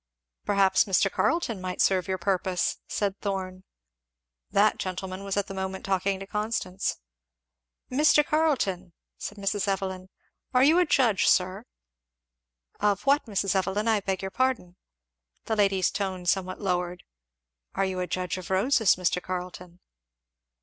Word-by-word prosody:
"Perhaps 200 0 +3
Mr. 195 -1 +2
Carleton 240 - 0
might 185 0 -5
serve 185 -2 +2
your 190 0 -1
purpose," 185 0 0
said 200 -1 -2
Thorn. 185 -2 -4 0.9
That 210 +2 +3
gentleman 185 +1 -4
was 195 0 -3
at 200 - +1
the 195 - -8
moment 190 0 -4
talking 195 0 0
to 195 - -7
Constance. 210 -2 -2 0.9
"Mr. 295 +2 +4
Carleton 235 - 0
" - - -61
said 210 - -6
Mrs. 200 0 -1
Evelyn, 190 -1 -2 0.5
"are 250 - +6
you 315 +5 +5
a 360 - +3
judge, 235 -9 +3
sir?" 185 +4 +2 1.1
"Of 205 -1 +1
what, 280 -1 +3
Mrs. 200 -2 0
Evelyn? 195 +3 0
I 220 -2 +3
beg 195 -1 -3
your 190 - -4
pardon." 250 -7 -1 0.7
The 220 - -1
lady's 195 -3 +2
tone 190 -3 -3
somewhat 185 +1 0
lowered. 180 -2 -2 0.7
"Are 195 - +1
you 190 -1 -3
a 180 - -2
judge 180 -1 -3
of 180 - -9
roses, 205 +2 +3
Mr. 180 0 0
Carleton?" 180 -1 -7
195 Hz, 145 wpm, -27 LUFS, 185-210 Hz, 1.1 s, are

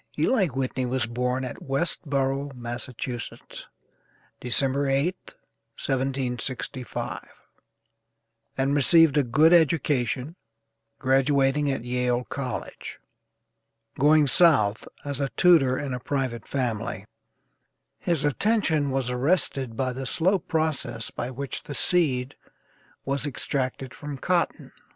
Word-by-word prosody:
Eli 215 -8 +3
Whitney 130 -2 -2
was 130 -2 0
born 125 +2 -1
at 125 - -7
Westborough, 140 -1 -1
Massachusetts, 120 0 -6 0.7
December 135 +3 0
8th, 140 +7 -1 0.4
1765, 130 -1 -3 1.3
and 135 +1 +1
received 155 +1 +5
a 145 - +5
good 155 +7 +4
education, 145 -3 +2 0.6
graduating 135 +2 +2
at 135 -4 -2
Yale 125 0 0
College. 135 0 -6 1.0
Going 150 +2 +5
South 130 - +3 0.2
as 140 -1 -3
a 140 -1 0
tutor 155 -8 +5
in 140 -3 -3
a 125 - -3
private 125 -4 -3
family, 125 -6 -2 0.9
his 165 -5 0
attention 160 -3 +1
was 130 -2 -1
arrested 130 -3 0
by 130 -1 0
the 130 +1 -4
slow 185 +8 +2
process 155 -9 -2
by 120 - -4
which 135 +1 -5
the 145 - -7
seed 140 -7 +1 0.7
was 140 +1 -1
extracted 130 -1 -3
from 145 -1 -7
cotton. 175 +5 -1
135 Hz, 105 wpm, -26 LUFS, 125-150 Hz, 1.3 s, received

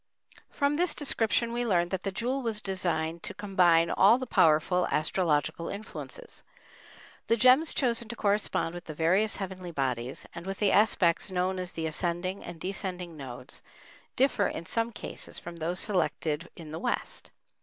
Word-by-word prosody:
From 285 0 +1
this 355 +1 +1
description 235 -4 0
we 240 +1 0
learn 175 -6 +2
that 190 -1 -2
the 195 - -2
jewel 245 +7 -1
was 225 -4 -2
designed 170 -5 -1
to - - -5
combine 180 -5 +3
all 210 +5 +6
the 260 - -4
powerful 180 -3 +3
astrological 155 0 0
influences. 220 - -6 0.9
The 230 - +3
gems 255 +7 +5
chosen 235 -3 0
to 235 - -4
correspond 205 -5 0
with 175 0 -8
the 155 - -7
various 185 +7 +2
heavenly 185 -2 -5
bodies, 130 -5 -2
and 170 +2 -8
with 195 0 -3
the 205 -2 +2
aspects 200 -4 +3
known 185 0 0
as 180 -1 -5
the 160 - -3
ascending 175 +4 -2
and 165 - -8
descending 180 -2 -4
nodes, 130 -2 -7 0.5
differ 255 -6 +3
in 170 - -5
some 230 +6 -1
cases 215 - -6
from 170 0 -8
those 170 +3 -2
selected 170 -4 -1
in 160 -3 -10
the 160 - -5
West. - - -3
185 Hz, 165 wpm, -29 LUFS, 170-220 Hz, 0.9 s, all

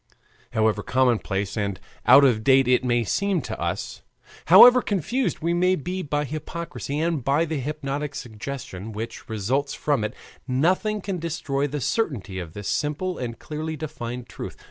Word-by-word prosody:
However 110 -2 +2
commonplace 110 -6 0
and 100 -3 -2 0.3
out 140 - +9
of 115 -5 +2
date 135 0 +5
it 125 0 +3
may 120 -1 +2
seem 200 - 0
to - - -5
us, - - -3 0.4
however 250 0 +9
confused 215 - -1
we 170 +2 +1
may 180 +2 +3
be 185 +4 -4
by 150 -2 -1
hypocrisy 155 0 -5
and 165 -4 0
by 140 +6 +2
the 160 -2 -3
hypnotic 145 +1 -3
suggestion 110 -4 -7
which 115 +3 -7
results 125 +7 -1
from 145 -7 0
it, 105 - -3 0.3
nothing 185 +11 +1
can 190 -2 -3
destroy 150 -4 -2
the 145 0 -4
certainty 125 - -1
of 85 -3 -7
this 105 -1 -6
simple 155 +5 -1
and 115 -2 -4
clearly 155 +1 -5
defined 125 -6 -6
truth. - - -8
140 Hz, 160 wpm, -24 LUFS, 115-165 Hz, 0.4 s, out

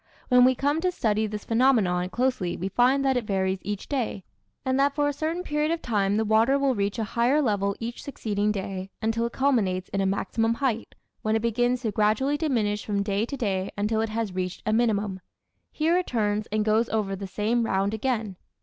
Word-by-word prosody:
When 250 -1 +6
we 260 0 +4
come 290 +5 0
to 365 +1 +1
study 220 -8 0
this 210 -1 -6
phenomenon 220 -8 +2
closely 245 -7 -1
we 190 +3 -3
find 255 +6 +3
that 265 -1 +3
it 245 - -1
varies 190 -1 0
each 205 0 -5
day, 240 -8 -2 0.4
and 260 +1 +1
that 280 0 +2
for 290 -1 +2
a 290 - 0
certain 320 +5 -2
period 300 -2 0
of 335 0 0
time 205 -6 0
the 220 - +1
water 225 +6 +4
will 275 -1 +2
reach 200 0 -1
a 225 - -1
higher 240 +6 +2
level 200 -7 +1
each 235 +1 -5
succeeding 210 -6 -1
day 195 -1 -4
until 225 +1 0
it 235 - -10
culminates 210 -10 +1
in 195 - -1
a 195 - +1
maximum 225 +4 0
height, 235 -4 -2 0.3
when 215 0 0
it 225 - 0
begins 245 +2 +1
to 220 - 0
gradually 215 +7 +2
diminish 225 -9 0
from 200 -1 -1
day 200 +2 -1
to 280 - -5
day 195 -5 -1
until 215 +2 0
it 225 - -1
has 220 -3 -2
reached 185 0 -4
a 215 - +1
minimum. 210 -4 +1 0.5
Here 320 +3 +1
it 365 - -4
turns 210 -3 0
and 215 0 -1
goes 220 +2 +2
over 205 -3 -1
the 195 0 -6
same 215 +5 0
round 195 -1 0
again. 220 -4 -2
220 Hz, 215 wpm, -26 LUFS, 200-255 Hz, 0.5 s, When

